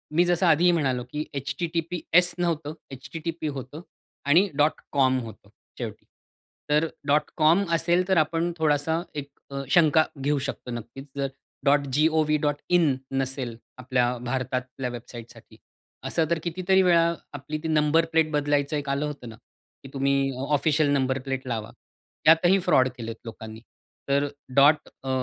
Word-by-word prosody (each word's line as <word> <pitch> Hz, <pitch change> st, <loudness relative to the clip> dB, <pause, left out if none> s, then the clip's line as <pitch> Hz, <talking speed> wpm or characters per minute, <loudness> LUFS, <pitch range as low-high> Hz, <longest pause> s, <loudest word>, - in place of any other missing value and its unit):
मी 175 Hz, +2 st, +5 dB
जसं 175 Hz, +1 st, +2 dB
आधीही 170 Hz, +2 st, +5 dB
म्हणालो 135 Hz, -7 st, 0 dB
की 150 Hz, +1 st, -3 dB
https 170 Hz, +5 st, 0 dB
नव्हतं 165 Hz, -4 st, -1 dB, 0.2 s
http 160 Hz, +4 st, -5 dB
होतं 135 Hz, +5 st, -8 dB, 0.5 s
आणि 155 Hz, +5 st, +6 dB, 0.5 s
.com 130 Hz, -2 st, +4 dB
होतं 115 Hz, -2 st, -11 dB, 0.3 s
शेवटी. -, -, -6 dB, 0.6 s
तर 150 Hz, +2 st, +3 dB, 0.5 s
.com 165 Hz, +6 st, +5 dB
असेल 175 Hz, +2 st, +2 dB
तर 190 Hz, -2 st, +2 dB
आपण 165 Hz, +2 st, +1 dB
थोडीशी 160 Hz, +1 st, +1 dB
एक 140 Hz, -1 st, -5 dB, 0.2 s
अ, 140 Hz, 0 st, -4 dB
शंका 160 Hz, 0 st, +5 dB, 0.2 s
घेऊ 145 Hz, +2 st, +1 dB
शकतो. 130 Hz, -2 st, -5 dB
नक्कीच 120 Hz, +3 st, -7 dB
जर 140 Hz, 0 st, 0 dB, 0.4 s
.govn.in 150 Hz, +2 st, +2 dB, 0.3 s
नसेल 130 Hz, -3 st, -3 dB, 0.2 s
आपल्या 125 Hz, -1 st, 0 dB
भारतातल्या 130 Hz, 0 st, -3 dB
वेबसाईटसाठी 120 Hz, 0 st, -11 dB, 0.5 s
असं 165 Hz, -, +1 dB
तर 170 Hz, -, +1 dB
कितीतरी 185 Hz, +2 st, +2 dB
वेळा 170 Hz, -2 st, +4 dB, 0.2 s
आपली 145 Hz, +2 st, -5 dB
ती -, -, -2 dB
नंबर 155 Hz, +1 st, +3 dB
प्लेट 160 Hz, -1 st, +3 dB
बदलायचं 145 Hz, 0 st, 0 dB
एक 145 Hz, -1 st, -4 dB
आलं 140 Hz, +2 st, 0 dB
होतं 145 Hz, -5 st, -7 dB
ना, 110 Hz, -, -10 dB
की 135 Hz, -, -19 dB
तुम्ही 135 Hz, 0 st, +1 dB
अ, -, -, -8 dB, 0.2 s
ऑफिशियल 150 Hz, 0 st, +2 dB
नंबर 135 Hz, -1 st, +1 dB
प्लेट 135 Hz, -1 st, -4 dB
लावा. 110 Hz, -3 st, -4 dB, 0.5 s
त्यातही 170 Hz, +4 st, +6 dB
फ्रॉड 130 Hz, -6 st, +4 dB
केलेत 115 Hz, -1 st, -6 dB
लोकांनी. 110 Hz, -1 st, -9 dB, 0.5 s
तर 140 Hz, +1 st, +2 dB, 0.3 s
डॉट 145 Hz, +2 st, +5 dB, 0.2 s
अ, 135 Hz, -, -5 dB
145 Hz, 140 wpm, -25 LUFS, 130-165 Hz, 0.6 s, आणि